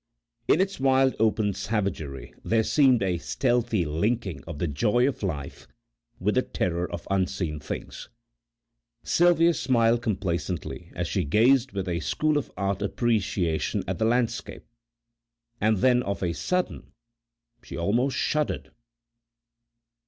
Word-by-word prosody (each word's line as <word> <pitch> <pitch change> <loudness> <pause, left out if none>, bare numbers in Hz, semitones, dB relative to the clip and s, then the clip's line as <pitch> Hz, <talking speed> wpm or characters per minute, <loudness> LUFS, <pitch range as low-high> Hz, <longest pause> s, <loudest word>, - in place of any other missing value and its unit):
In - - +4
its 195 -3 0
wild 135 0 +3
open 110 -2 +2
savagery 100 -9 -3
there 115 0 +2
seemed 130 -4 +4
a 90 -3 0
stealthy 120 - 0
linking 95 - -1
of 80 -3 -7
the 85 - -1
joy 105 - +2
of 140 - -3
life 75 -8 -5 0.5
with 105 +3 +1
the 130 - +3
terror 90 -6 -2
of 85 -1 -6
unseen 90 -5 -1
things. 75 - -7 0.9
Sylvia 170 -1 +4
smiled 120 -4 +2
complacently 95 -6 -3
as - - -2
she - - 0
gazed 120 - +3
with 95 -2 -3
a 85 -1 -1
School 150 - +1
of 140 - -7
Art 100 +1 -1
appreciation 100 -6 0
at - - -3
the 110 - +2
landscape, 120 0 -1 1.0
and 110 0 +3
then 125 +5 +4
of 100 -4 -3
a 85 -2 0
sudden 180 - -2 0.7
she - - -8
almost 115 +10 +1
shuddered. 150 -1 -1
105 Hz, 130 wpm, -26 LUFS, 90-125 Hz, 1.0 s, In